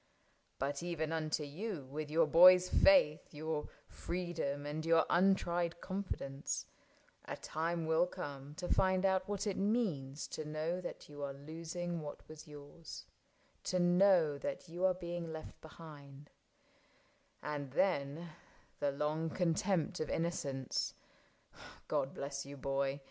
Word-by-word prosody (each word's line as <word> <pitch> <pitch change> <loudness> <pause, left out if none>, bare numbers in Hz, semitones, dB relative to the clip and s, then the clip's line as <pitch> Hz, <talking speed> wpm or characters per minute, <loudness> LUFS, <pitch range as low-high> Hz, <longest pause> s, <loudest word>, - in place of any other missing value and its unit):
But 140 +2 -2
even 165 -2 -2
unto 155 -1 -1
you, 160 +1 -5
with 145 +3 -5
your 165 +2 +4
boy's 180 +3 +8
faith, 275 - +5
Your 155 0 -3 0.2
freedom, 170 -5 -3
and 150 +2 -3
your 165 0 +4
untried 175 -2 +2
confidence, 185 -8 -3 0.6
A - - -5
time 165 +1 -2
will 160 +2 +3
come 145 -5 -7
to 180 +2 -4
find 185 +1 +3
out 190 -1 +2
what 205 0 -1
it 200 -2 -1
means 180 - 0
To 155 - -4
know 155 +4 -2
that 175 - -7
you 145 -1 -9
are 140 -1 -3
losing 165 +4 -5
what 150 -1 -8
was 155 +1 -11
yours, 150 +2 -10 0.6
To 185 - +1
know 175 -4 +5
that 280 -9 -4
you 175 +2 -5
are 185 -1 +4
being 175 -2 -4
left 160 0 -8
behind; 145 -3 -12 1.1
And 145 -2 -3
then 160 -1 +1 0.5
the 145 -1 +1
long 155 +3 -1
contempt 180 +2 +1
of 155 - -2
innocence 140 -6 -1 0.5
— - - -16
God 135 - 0
bless 140 0 -4
you, 140 +1 -9
boy 135 +1 -1
160 Hz, 140 wpm, -35 LUFS, 145-180 Hz, 1.1 s, boy's